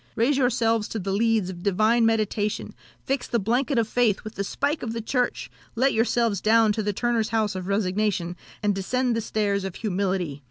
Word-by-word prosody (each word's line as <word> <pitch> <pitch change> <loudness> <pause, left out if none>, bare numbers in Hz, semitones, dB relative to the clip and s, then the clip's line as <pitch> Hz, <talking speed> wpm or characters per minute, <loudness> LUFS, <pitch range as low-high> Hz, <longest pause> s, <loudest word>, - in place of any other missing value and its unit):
Raise 240 +6 +2
yourselves 230 -4 +1
to - - -5
the 195 -1 -3
leads 215 -2 +1
of 175 -1 -10
divine 215 +4 +3
meditation, 215 -1 -1 0.3
fix 270 -2 -1
the 235 - 0
blanket 245 +6 0
of 230 -2 +2
faith 230 -4 +1
with 215 - -7
the 200 - -3
spike 285 +9 -1
of 225 -2 -4
the 230 - -3
Church, 245 +2 -1 0.2
let 260 +4 +2
yourselves 225 -3 +1
down 225 0 +4
to 215 - -1
the 205 0 0
turner's 230 +1 0
house 220 -2 0
of 185 -1 -5
resignation, 200 -3 0 0.3
and 205 -1 +2
descend 245 +6 0
the 230 - 0
stairs 205 -2 -1
of 195 -2 -5
humility! 185 -7 -2
220 Hz, 195 wpm, -25 LUFS, 200-235 Hz, 0.3 s, down